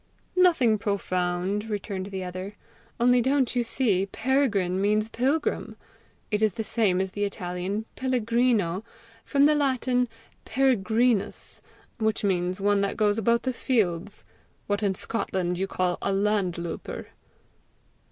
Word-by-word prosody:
"Nothing 320 - +4
profound," 190 0 -1
returned 200 -2 -3
the 190 -2 -5
other. 185 +3 -6 0.4
"Only 245 +1 +4
don't 265 0 +1
you 245 - +2
see 215 -6 +1
Peregrine 205 -6 +1
means 210 +2 +1
pilgrim? 275 +7 -1 0.6
It 210 0 +1
is 215 -4 +2
the 220 - -2
same 210 -5 +1
as 190 0 -1
the 205 +2 -3
Italian 195 +1 -3
pellegrino, 235 -6 +1 0.4
from 280 0 +3
the 300 - +5
Latin, 255 -4 +1 0.3
peregrinus, 235 -3 +1 0.4
which 220 -1 0
means 180 -1 0
one 200 0 +2
that 200 - -1
goes 210 0 +2
about 235 +2 +2
the 260 - -1
fields, 205 -7 -1 0.4
what 205 0 -1
in 200 -2 +1
Scotland 180 -5 -2
you 195 - 0
call 180 -2 -1
a 200 - 0
LANDLOUPER." 195 -4 -2
210 Hz, 130 wpm, -26 LUFS, 190-240 Hz, 0.6 s, the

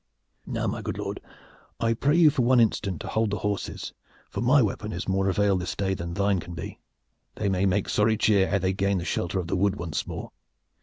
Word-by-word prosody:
Now, - - -2
my - - -2
good - - -4
lord, - - -4 0.6
I 115 0 +2
pray 140 +6 +1
you 160 -3 +7
for 135 - 0
one 125 +1 +4
instant 100 -6 +1
to - - -6
hold 110 -1 0
the 105 - -1
horses, 100 +1 -3 0.4
for - - -3
my 130 +5 +5
weapon 105 -2 -1
is 90 - -3
of - - -6
more 95 0 +2
avail 100 0 +2
this 90 0 -3
day, 95 -1 0
than 85 -2 -5
thine 100 -1 +2
can 85 +1 -8
be. 85 - -7 0.6
They 100 - -1
may 95 0 +2
make 95 +1 +1
sorry 110 +1 +2
cheer 100 -3 +3
ere 100 - +2
they 95 0 0
gain 100 +1 +1
the 85 - -3
shelter 90 0 -1
of 90 - -1
the 85 - -2
wood 100 +1 +2
once 85 -5 -3
more." - - -6
100 Hz, 235 wpm, -26 LUFS, 95-110 Hz, 0.6 s, you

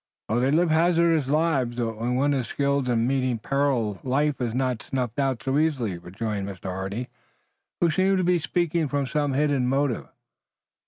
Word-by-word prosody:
"Oh, 110 +3 +1
they 130 +2 +2
live 165 +3 +3
hazardous 165 -2 +3
lives, 140 -5 +1
but 115 -2 -2
when 120 +3 -2
one 145 +3 +2
is 130 -4 -1
skilled 140 -2 0
in 115 -1 +2
meeting 130 -2 0
peril 125 -5 0
life 140 +2 0
is 120 -2 -1
not 130 -3 0
snuffed 125 -2 -3
out 135 -5 0
so 135 +2 +1
easily," 125 - 0
rejoined 100 +3 -4
Mr. 95 -1 -6
Hardy 95 +6 -4 0.7
who 170 -2 +3
seemed 190 +4 +2
to 185 - +1
be 180 0 +3
speaking 165 +1 0
from 140 0 -1
some 145 +1 -1
hidden 140 -2 +1
motive. 135 -1 0
135 Hz, 175 wpm, -25 LUFS, 120-150 Hz, 0.7 s, live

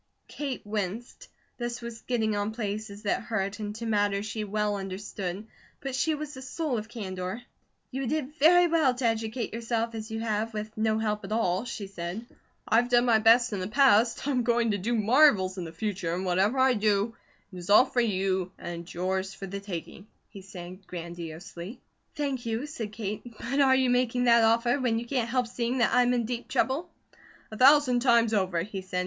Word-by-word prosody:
Kate 275 -6 -5
winced. 210 +2 -4 0.3
This 240 0 -3
was 235 -1 -8
getting 220 -4 0
on 205 +1 -1
places 210 -1 -5
that 205 - 0
hurt 205 -2 -3
and 210 -1 -4
to 230 +1 -6
matters 205 -2 +1
she 215 0 -4
well 210 0 -1
understood, 195 0 -5 0.3
but 270 -2 -5
she 285 +5 +1
was 300 0 -6
the 260 - -9
soul 265 -1 -2
of 215 +1 -9
candour. 190 0 -5 0.5
"You 265 0 -3
did 300 0 -2
very 350 +4 +7
well 320 -7 +3
to 250 0 -3
educate 225 0 -1
yourself 230 0 -2
as 220 0 -6
you 220 0 -4
have, 220 0 -2
with 215 +1 -5
no 220 0 +1
help 210 -1 -1
at 195 - -8
all," 215 -2 0
she 215 -4 -5
said. 190 +3 -6 0.4
"I've 235 +3 +3
done 245 0 +4
my 230 -3 +4
best 230 +1 +5
in 200 - -2
the 185 - -3
past, 235 0 +3
I'm 265 -3 +1
going 235 -1 +2
to 205 - -1
do 235 +6 -1
marvels 215 -5 +4
in 175 - -4
the 165 - -7
future, 175 -2 -3
and 185 +2 -3
whatever 190 +7 +2
I 260 0 +5
do, 210 0 +1 0.4
it - - -8
is 175 +1 -8
all 210 +5 +8
for 245 - 0
you 190 -4 0
and 170 0 -7
yours 190 +2 -2
for 195 - -7
the 200 +1 -5
taking," 195 0 -7 0.2
he 200 - -11
said 185 0 -10
grandiosely. 170 +4 -7 0.4
"Thank 270 -5 -2
you," 225 +4 -2
said 235 -8 -6
Kate. 210 -1 -4 0.2
"But 275 +6 -1
are 265 -1 +5
you 260 -1 +2
making 245 0 +1
that 235 -1 +5
offer 235 +4 +3
when 240 -3 +1
you 235 - -3
can't 240 -2 -1
help 250 0 +1
seeing 240 +1 -2
that 240 - +2
I'm 245 0 +4
in 235 -2 0
deep 240 +1 -4
trouble?" 280 +7 0 0.6
"A 215 - -7
thousand 265 -2 +6
times 235 -2 +3
over," 185 -5 +1
he 195 0 -6
said. 185 -1 -3
220 Hz, 200 wpm, -28 LUFS, 200-245 Hz, 0.6 s, all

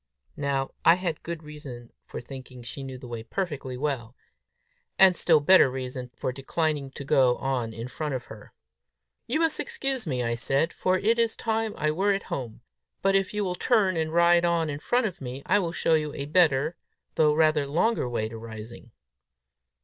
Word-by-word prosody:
Now 140 -1 -1
I 165 - +7
had 175 -4 -3
good 170 -1 -6
reason 140 -6 -10
for - - -7
thinking 130 -1 -10
she 120 +4 -6
knew 135 -1 -7
the 125 -1 -10
way 120 -1 -5
perfectly 140 - -4
well; 130 -4 -3 0.8
and 190 -2 +7
still 160 -3 +4
better 150 -1 +6
reason 130 -1 -5
for - - -2
declining 145 +1 -2
to 140 - -7
go 130 -2 +4
on 125 -4 -2
in 115 +2 -6
front 150 +2 -4
of 125 - -5
her. 110 -1 -12 0.8
"You 280 +7 0
must 325 -1 +2
excuse 270 - -2
me," 125 -4 -1
I 115 0 0
said, 135 +7 0
"for 185 0 +1
it 225 +5 +2
is 230 -1 +2
time 225 -1 -1
I 155 0 +1
were 195 +6 +2
at 195 - -2
home; 120 -3 -5 0.4
but 195 0 +3
if 195 -1 +1
you 210 0 -1
will 185 -2 -1
turn 195 -1 +2
and 160 -1 -1
ride 170 +1 +4
on 170 -3 +1
in 145 - -5
front 245 +9 +1
of 190 -8 -4
me, 130 +1 -6
I 205 +3 +3
will 170 -4 -2
show 165 -1 +1
you 150 -2 0
a 140 - -4
better, 155 -1 +2 0.4
though 150 -1 +3
rather 155 -2 +3
longer 170 - +1
way 110 -2 -1
to 115 0 -8
Rising." 115 +1 -10
150 Hz, 195 wpm, -26 LUFS, 130-180 Hz, 0.8 s, I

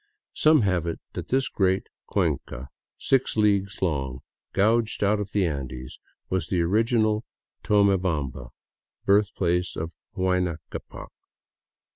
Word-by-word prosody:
Some 155 -2 +5
have 90 -4 +1
it 85 - -3
that - - -5
this 130 +1 +1
great 95 -1 +1 0.2
cuenca, 65 +1 -2 0.3
six 135 -4 +1
leagues 100 -1 +2
long, 65 -7 -1 0.3
gouged 110 +2 +2
out 105 +1 +3
of 105 0 -4
the 100 -3 +2
Andes, 65 -5 -5 0.3
was 95 0 -1
the 90 -3 +1
original 110 +3 +2 0.4
Tonie 100 -2 +4
bamba, 75 -9 -2 0.6
birthplace 95 -3 +2
of 80 +1 -4 0.3
Huayna 90 -3 +1
Ccapac. - - -8
95 Hz, 120 wpm, -26 LUFS, 85-105 Hz, 0.6 s, Some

